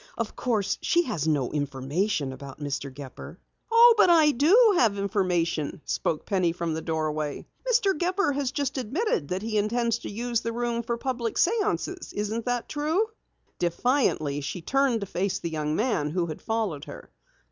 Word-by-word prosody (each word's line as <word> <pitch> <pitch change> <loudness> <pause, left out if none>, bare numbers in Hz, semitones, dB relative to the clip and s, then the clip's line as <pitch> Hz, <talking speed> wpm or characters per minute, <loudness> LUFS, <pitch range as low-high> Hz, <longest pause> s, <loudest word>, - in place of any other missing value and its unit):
Of 230 -2 -3
course, 220 -6 0
she 345 0 +3
has 190 - -2
no 145 -5 +1
information 145 +2 -1
about 135 +1 -10
Mr. 140 -1 -4
Gepper." 135 -1 -10 0.3
"Oh, 470 +1 +8
but 370 - +6
I 320 -3 +6
do 400 - +5
have 215 -4 +3
information," 180 -6 0
spoke 155 - -1
Penny 185 -4 +1
from 170 -2 -2
the 160 - -3
doorway. 155 -2 -2 0.3
"Mr. 410 -5 +3
Gepper 360 +1 +1
has 275 -2 -1
just 280 -1 -2
admitted 260 - -1
that 185 +5 -3
he 215 -1 0
intends 230 +2 0
to - - -7
use 235 +2 -2
the 230 0 -3
room 235 0 -1
for 235 0 -3
public 240 -2 -2
séances. 400 -2 0
Isn't 215 +2 -2
that 245 -1 -1
true?" 320 +9 0 0.5
Defiantly, 170 - +1
she 165 +5 -5
turned 270 0 +2
to - - -2
face 190 +1 -1
the 170 - -5
young 155 -1 -1
man 210 - 0
who 170 +2 0
had 160 -2 -7
followed 215 -10 -2
her. - - -11
215 Hz, 170 wpm, -26 LUFS, 160-270 Hz, 0.5 s, Oh